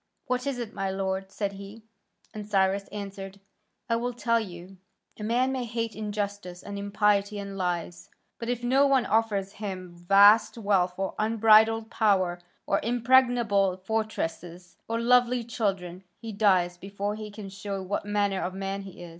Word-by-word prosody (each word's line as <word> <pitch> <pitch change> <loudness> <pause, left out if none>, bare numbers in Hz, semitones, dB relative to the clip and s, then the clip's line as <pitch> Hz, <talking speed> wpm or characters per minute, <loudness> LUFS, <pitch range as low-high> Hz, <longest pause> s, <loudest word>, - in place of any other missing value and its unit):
"What 250 +2 -2
is 275 -3 -1
it, 235 -2 -5
my 195 -1 -2
lord?" 190 0 -2
said 200 -1 -2
he. 200 +3 -11 0.5
And 210 -1 -8
Cyrus 195 0 +1
answered, 200 -1 -7 0.5
"I 230 - +1
will 245 +1 -2
tell 230 -1 +1
you. 185 -2 -9 0.4
A - - -5
man 245 +4 +1
may 260 -1 -2
hate 230 -1 -3
injustice 205 -4 -4
and 200 0 -6
impiety 205 0 +1
and 200 -1 -6
lies, 175 -2 -3 0.3
but 230 - -4
if 245 -1 -2
no 270 +3 +4
one 270 -3 +3
offers 210 -3 0
him 185 -4 -5
vast 200 +6 +5
wealth 195 -4 +1
or 195 0 -2
unbridled 220 +1 +4
power 185 -5 +2 0.3
or 200 - +1
impregnable 235 -5 +3
fortresses 180 -4 -4
or 230 0 -1
lovely 245 0 +3
children, 195 -6 -3 0.2
he 230 -1 -7
dies 185 -4 +2
before 200 +2 -4
he 215 0 -7
can 205 -1 -9
show 195 0 -5
what 195 +2 -2
manner 205 -2 0
of 185 +1 -3
man 195 0 -3
he 190 -2 -10
is. 175 - -9
205 Hz, 165 wpm, -27 LUFS, 190-225 Hz, 0.5 s, vast